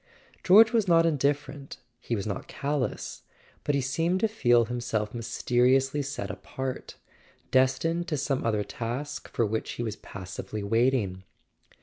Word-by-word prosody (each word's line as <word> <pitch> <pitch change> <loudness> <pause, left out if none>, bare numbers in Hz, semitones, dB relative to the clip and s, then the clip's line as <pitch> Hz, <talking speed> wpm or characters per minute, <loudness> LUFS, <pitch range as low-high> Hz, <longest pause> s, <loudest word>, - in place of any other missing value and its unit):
George 220 +5 +7
was 220 -4 +2
not 165 -1 +5
indifferent, 145 -2 -1 0.2
he 120 - -2
was 100 - -3
not 100 -2 -4
cal¬ 145 +1 -2
lous; - - -8 0.4
but 145 - +1
he 140 - +1
seemed 165 +8 0
to 225 - +4
feel 120 - +3
himself 120 -3 -2
mysteriously 125 +4 +2
set 140 +1 -4
apart, 130 -1 -6 0.6
destined 135 +7 +2
to 150 - -1
some 135 -1 -1
other 105 -2 +1
task 125 +8 -5
for 115 - +1
which 110 +1 -2
he 120 - -4
was 110 -2 -4
passively 95 +3 -7
waiting. 115 -3 +1
130 Hz, 145 wpm, -27 LUFS, 115-145 Hz, 0.6 s, George